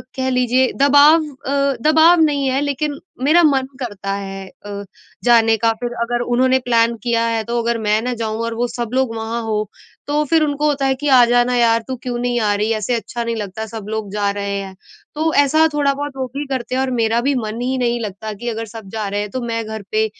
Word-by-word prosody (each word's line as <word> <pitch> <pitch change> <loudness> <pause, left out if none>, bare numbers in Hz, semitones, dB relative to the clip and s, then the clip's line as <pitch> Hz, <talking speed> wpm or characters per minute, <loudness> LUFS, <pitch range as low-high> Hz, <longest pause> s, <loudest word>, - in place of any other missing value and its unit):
कह 260 0 -1
लीजिए, 250 0 +2
दबाव 290 +3 +6
अ, 280 -1 -2
दबाव 320 +3 +5
नहीं 285 -3 +2
है, 265 +1 +1
लेकिन 290 +1 -2 0.3
मेरा 320 +5 +5
मन 270 -4 +3
करता 200 -5 -4
है 195 -1 -6 0.2
अ, 200 0 -6 0.4
जाने 225 -2 +5
का। 225 +1 +2
फ़िर 240 0 -3
अगर 240 +1 -1 0.2
उन्होंने 260 +1 +3
प्लान 230 -1 +2
किया 230 -1 +1
है, 225 -1 -1
तो 235 +1 -1
अगर 235 0 0
मैं 215 +1 +3
ना 250 +1 -2
जाऊँ 220 0 -2
और 230 - -3
वो 245 +1 0
सब 235 -2 -4
लोग 260 -3 0
वहाँ 225 +1 -3
हो, 215 -2 -2 0.4
तो 295 +1 +1
फ़िर 315 +2 +3
उनको 295 0 0
होता 280 -2 0
है 265 0 +2
कि, 295 +3 -4
"आ 255 -3 +7
जाना 245 +1 +2
यार 230 -1 +3
तू 260 - -3
क्यों 245 -1 -3
नहीं 245 0 0
आ 210 -1 +2
रही 210 +2 -1
है? 220 - +1
ऐसे 215 +4 -2
अच्छा 235 +1 -4
नहीं 230 0 -2
लगता, 215 0 -5
सब 220 -1 -8
लोग 220 -3 -4
जा 205 -1 0
रहे 200 0 -2
हैं।" 190 -1 -8 0.4
तो 320 +1 0
ऐसा 315 +3 +3
थोड़ा-बहुत 285 0 0
वो 260 - -1
भी 290 +1 -3
करते 255 -2 -3
हैं 260 - +1
और 265 - -1
मेरा 225 +1 +2
भी 275 +2 +1
मन 220 +3 -5
ही 260 +1 -1
नहीं 240 -1 0
लगता 210 +1 -5
कि, 240 +4 -5
अगर 225 0 -4
सब 215 -4 -9
जा 210 -2 -2
रहे 205 - -2
हैं, 210 - -4
तो 255 - -3
मैं 230 0 -1
घर 220 -1 -6
पे 215 0 +2
240 Hz, 240 wpm, -19 LUFS, 220-270 Hz, 0.4 s, आ